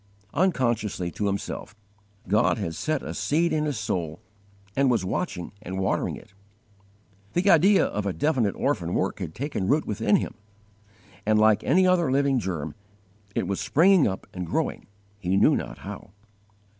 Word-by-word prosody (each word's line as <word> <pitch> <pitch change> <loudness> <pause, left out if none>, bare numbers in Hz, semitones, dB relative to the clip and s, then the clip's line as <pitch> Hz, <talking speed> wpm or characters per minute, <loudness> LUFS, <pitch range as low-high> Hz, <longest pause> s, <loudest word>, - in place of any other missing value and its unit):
Unconsciously 120 - 0
to 105 - -2
himself, 100 +1 -4 0.5
God 110 +5 +3
had 95 -6 -3
set 155 - -2
a - - -5
seed 165 +4 +1
in 155 -1 +1
his 145 -5 -2
soul, 85 -6 -3 0.6
and 135 -1 +3
was 115 -7 +1
watching 95 - -3
and 95 -1 -6
watering 95 - 0
it. - - -14 1.0
The 180 +3 +1
idea 190 +5 +5
of 105 0 -2
a - - +1
definite 130 - +1
orphan 90 -12 -1
work 95 - -1
had 85 -5 -5
taken 125 -6 -3
root 150 +6 +2
within 105 - +1
him, - - -1 0.9
and, 110 0 +3
like 110 -1 +4
any 185 +6 +4
other 175 -6 +3
living 135 -1 +2
germ, 80 -7 -4 0.6
it - - 0
was 100 - -2
springing 180 +1 +4
up 95 -2 -4
and 90 - -4
growing, - - -2 0.3
he 95 0 0
knew - - +5
not - - -4
how. - - -9
110 Hz, 160 wpm, -26 LUFS, 95-150 Hz, 1.0 s, idea